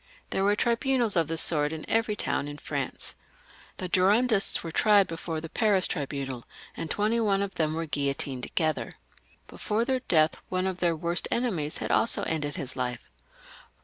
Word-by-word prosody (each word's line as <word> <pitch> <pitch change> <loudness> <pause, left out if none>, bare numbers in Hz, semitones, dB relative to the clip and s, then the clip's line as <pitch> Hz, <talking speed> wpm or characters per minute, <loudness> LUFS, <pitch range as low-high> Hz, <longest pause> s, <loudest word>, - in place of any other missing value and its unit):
There 190 - 0
were 205 +1 +3
tribunals 235 0 +4
of 165 -3 +2
this 165 0 +1
sort 150 -2 +2
in 160 -1 -7
every 225 -1 +1
town 145 - -2
in 145 0 -7
France. - - -4 0.6
The 185 - -3
Girondists 200 +4 +3
were 165 - -5
tried 205 +2 +4
before 165 -1 -5
the 165 - -7
Paris 205 0 +2
tribunal, 135 -5 -4 0.3
and 165 - -5
twenty 215 +5 +1
one 200 -3 +1
of 195 -1 -5
them 155 -1 -1
were 165 0 -2
guillotined 140 -3 0
together. 155 +4 -1 0.5
Before 220 +2 -2
their 260 0 0
death 160 -10 +1
one 185 0 -1
of 185 -1 -2
their 170 -2 +1
worst 170 +2 -2
enemies 185 -12 -1
had - - -3
also 230 - +2
ended 145 -3 -2
his 130 - -5
life. 125 -2 -4
175 Hz, 175 wpm, -27 LUFS, 155-210 Hz, 0.6 s, tribunals